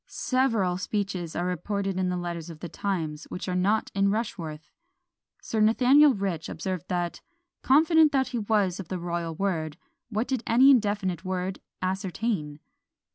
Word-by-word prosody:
Several 225 -9 0
speeches 195 -4 -3
are 175 - -1
reported 195 +2 -2
in 185 -1 +1
the 180 - -1
letters 175 -1 -5
of 160 -2 -10
the 175 - -6
times, 160 -4 -3
which 180 - -6
are 180 - -1
not 200 +4 +1
in 200 0 +2
Rushworth. 165 -8 -4 0.7
Sir 220 - -2
Nathaniel 255 +6 +5
Rich 190 -5 -3
observed 185 -2 -4
that, 175 -1 -2 0.4
"confident 310 +2 +5
as 265 -1 +2
he 245 -2 -2
was 205 -4 +1
of 190 - -6
the 185 - -3
royal 170 -1 -3
word, 160 -5 -2 0.3
what 220 +2 -1
did 260 -3 -1
any 260 +4 +6
indefinite 205 - +1
word 185 0 -3 0.2
ascertain?" 185 -4 -2
190 Hz, 155 wpm, -27 LUFS, 175-220 Hz, 0.7 s, any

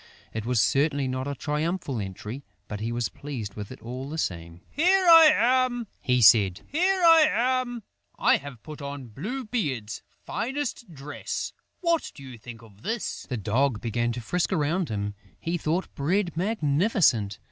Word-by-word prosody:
It 110 0 -4
was 125 -2 +2
certainly 140 +4 +2
not 130 +1 -3
a 140 - -3
triumphal 150 -1 -2
entry, 105 +7 -6 0.2
but 105 - -5
he 115 +2 -3
was 120 -1 -1
pleased 125 -8 -7
with 105 +1 -7
it 130 - -9
all 130 +4 -6
the 160 - -5
same: 85 - -4
"Here 370 +5 +3
I 330 -2 +10
am!" 250 -2 +2 0.2
he 125 -1 +2
said. 95 -2 +6
"Here 365 +5 +1
I 325 -2 +8
am! 245 -1 0 0.3
I - - +4
have 140 -5 -10
put 155 -1 -9
on 140 -3 -6
Blue 215 - -5
beard's 135 - -3 0.2
finest 255 -4 -3
dress.... 145 -1 -5 0.3
What 335 -2 +1
do 140 - -11
you 130 -3 -10
think 115 0 -11
of 105 -2 -18
this?" 225 - -4
The 125 - -2
Dog 115 +3 +1
began 120 +1 -1
to 120 - -5
frisk 175 +11 -1
around 170 +1 0
him: 105 -1 -3 0.3
he 165 +1 -2
thought 170 +2 -2
Bread 170 +4 0
magnificent! 160 - +1
145 Hz, 170 wpm, -26 LUFS, -, 0.3 s, I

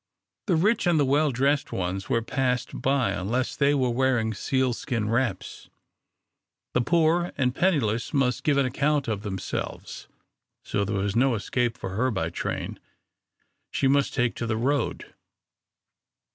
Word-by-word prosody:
The 180 - +3
rich 200 +5 +2
and 155 -5 +3
well 145 +3 +3
dressed 140 +3 +1
ones 95 +1 -3
were 115 -1 +1
passed 125 0 -1
by 135 -2 +2
unless 120 +7 -1
they 145 0 +3
were 130 -3 +1
wearing 120 -3 +1
sealskin 120 -2 -1
wraps, 115 -6 -2 1.0
the 125 - +2
poor 170 +4 +2
and 125 -3 +1
penniless 125 - +1
must 130 -4 +1
give 145 -2 +2
an 140 - +3
account 140 +2 0
of 105 -3 -2
themselves. 95 -3 -5 0.6
So 100 - -1
there 100 0 -2
was 100 0 -1
no 125 +1 +3
escape 120 +3 -1
for 95 - -5
her 120 +7 +1
by 95 -8 -2
train. - - -4 0.9
She 135 - +1
must 140 +1 +2
take 125 -3 +1
to 115 - -3
the 110 -1 0
road. 140 +5 -1
125 Hz, 145 wpm, -26 LUFS, 110-140 Hz, 1.0 s, The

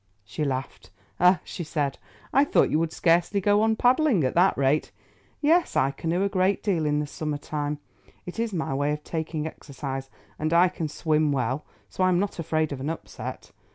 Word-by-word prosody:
She 105 +9 -4
laughed. 135 -2 -4 0.3
"Ah," 180 +1 +5
she 175 - -6
said, 150 -3 -2 0.3
"I 275 - +6
thought 290 - +3
you 155 - +3
would 165 -1 0
scarcely 170 +5 +2
go 205 +2 +3
on 220 0 +3
paddling 250 - +3
at 130 - 0
that 180 +3 +4
rate. 140 +2 +1 0.5
Yes, 325 +3 +3
I 135 - +3
canoe 165 +6 -1
a - - +3
great 195 0 +1
deal 175 -7 +1
in 150 0 +1
the 150 - -1
summer 150 0 -4
time. 145 0 -3 0.5
It 180 +5 -7
is 230 -1 0
my 160 -7 -2
way 145 +2 +1
of 150 0 -6
taking 160 -1 -3
exercise, 135 -3 -6 0.3
and 155 +2 0
I 175 +2 +6
can 170 -3 -4
swim 155 0 +1
well, 135 +1 -1 0.2
so 185 - -2
I 185 - +4
am 180 - +3
not 200 -2 -2
afraid 155 -1 0
of 140 - -4
an 140 +3 -3
upset. 165 - -7
160 Hz, 200 wpm, -26 LUFS, 145-185 Hz, 0.5 s, I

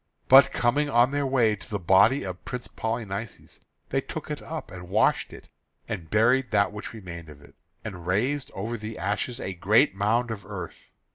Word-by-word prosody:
But 135 +1 +8
coming 145 +5 +1
on 120 0 +4
their 145 -1 0
way 120 -5 +3
to 100 - -14
the 105 - -2
body 95 - +4
of 90 -1 -6
Prince 125 -1 -6
Polynices, 110 -1 -5 0.3
they - - 0
took - - -7
it - - -4
up, - - -7
and 90 -1 -9
washed - - +2
it, - - -12 0.4
and 85 -3 -5
buried 125 +4 +3
that 100 -2 +2
which 105 - -7
remained 85 -7 -9
of 75 -1 -13
it, - - -17 0.3
and 90 -2 -7
raised 125 +9 0
over 115 +4 -4
the 110 +1 -6
ashes 105 +6 -2
a 95 - -4
great 105 +8 +3
mound 115 +5 +1
of 105 -3 -6
earth. 95 -4 -8
110 Hz, 190 wpm, -26 LUFS, 95-120 Hz, 0.4 s, But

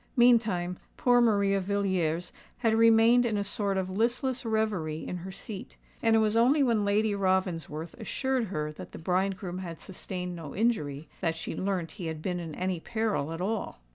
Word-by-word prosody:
Meantime, 220 -8 +3 0.2
poor 245 -1 +4
Maria 200 -4 +3
Villiers 185 -4 -1 0.2
had 230 -3 +2
remained 230 +2 +6
in 225 -3 0
a 205 - 0
sort 200 -1 0
of 190 -1 -1
listless 240 +6 0
reverie 210 -9 -1
in 180 - -3
her 185 +2 -7
seat; 200 +1 -8 0.3
and 225 -1 +4
it - - +5
was 215 0 +2
only 260 +6 +5
when 230 -5 +2
Lady 205 +1 +2
Ravensworth 180 -5 -1
assured 260 +2 -1
her 150 -6 -3
that 150 - -10
the - - -7
bridegroom 185 +1 -1
had 170 -3 -6
sustained 180 -1 -6
no 160 -4 -8
injury, 160 -10 0
that 165 -3 0
she 165 - -5
learnt 185 -4 -2
he 180 -5 -6
had 160 -1 -4
been 180 -1 -1
in 165 -3 -6
any 185 -1 -1
peril 220 -7 -1
at 165 +1 -5
all. 205 - -2
195 Hz, 180 wpm, -29 LUFS, 175-225 Hz, 0.3 s, remained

